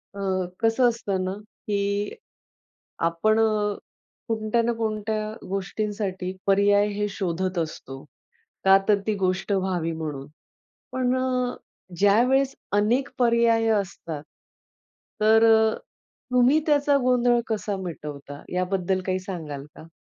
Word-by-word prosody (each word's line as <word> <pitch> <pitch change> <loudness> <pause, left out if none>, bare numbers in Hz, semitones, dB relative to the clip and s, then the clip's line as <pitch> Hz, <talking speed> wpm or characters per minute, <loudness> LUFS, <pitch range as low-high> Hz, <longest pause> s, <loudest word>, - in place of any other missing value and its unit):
अ, - - -7 0.4
कसं 225 +2 +3
असतं 200 -5 -2
ना 185 0 -2 0.3
की, 200 0 -1 1.0
आपण 215 +7 +1
अ, 210 -2 +1 0.5
कोणत्या 225 +1 0
ना 235 +1 +1
कोणत्या 215 -1 -2 0.2
गोष्टींसाठी 195 -1 -3
पर्याय 200 +1 +4
हे 210 +1 -1
शोधत 185 -1 -2
असतो. 135 -4 -5 0.6
का 195 0 +7
तर 205 -1 +4
ती 215 - +1
गोष्ट 185 +1 -1
व्हावी 185 -4 0
म्हणून. 150 -4 -5 0.7
पण 255 -1 +1
अ, 255 -1 -1 0.4
ज्यावेळेस 250 +7 +3 0.2
अनेक 225 +7 +2
पर्याय 235 -2 +3
असतात, 170 -6 -7 1.0
तर 220 +1 +5
अ, 220 0 +3 0.6
तुम्ही 250 +5 +5
त्याचा 285 -1 +3
गोंधळ 245 -1 +3
कसा 210 -2 -2
मिटवता, 145 -4 -7
याबद्दल 185 0 0
काही 185 0 0
सांगाल 160 -7 -6
का? 160 - -12
205 Hz, 115 wpm, -25 LUFS, 185-230 Hz, 1.0 s, का